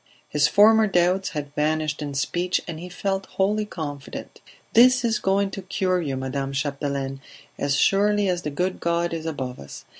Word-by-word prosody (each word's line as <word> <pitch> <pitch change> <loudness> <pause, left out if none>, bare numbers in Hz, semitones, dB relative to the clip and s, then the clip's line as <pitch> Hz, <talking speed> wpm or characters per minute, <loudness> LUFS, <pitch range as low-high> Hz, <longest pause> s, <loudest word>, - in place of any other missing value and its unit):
His 150 -1 +2
former 220 +2 +6
doubts 180 0 +2
had 145 -2 -6
vanished 155 0 0
in 145 -1 -4
speech 175 +6 0
and 165 -2 -5
he 180 +2 -8
felt 195 +1 -2
wholly 210 +2 0
confident. 145 -7 -7 0.3
"This 250 +1 +6
is 225 -2 +1
going 195 +1 +1
to 195 - -6
cure 185 -1 0
you, 140 -5 -3
Madame 135 +1 -3
Chapdelaine, 140 -1 -3 0.4
as 140 0 +1
surely 205 +5 +3
as 180 -1 0
the 150 - -3
good 180 +6 -2
God 170 0 0
is 165 -1 -4
above 130 -5 -4
us. 70 - -10
170 Hz, 175 wpm, -24 LUFS, 145-195 Hz, 0.4 s, former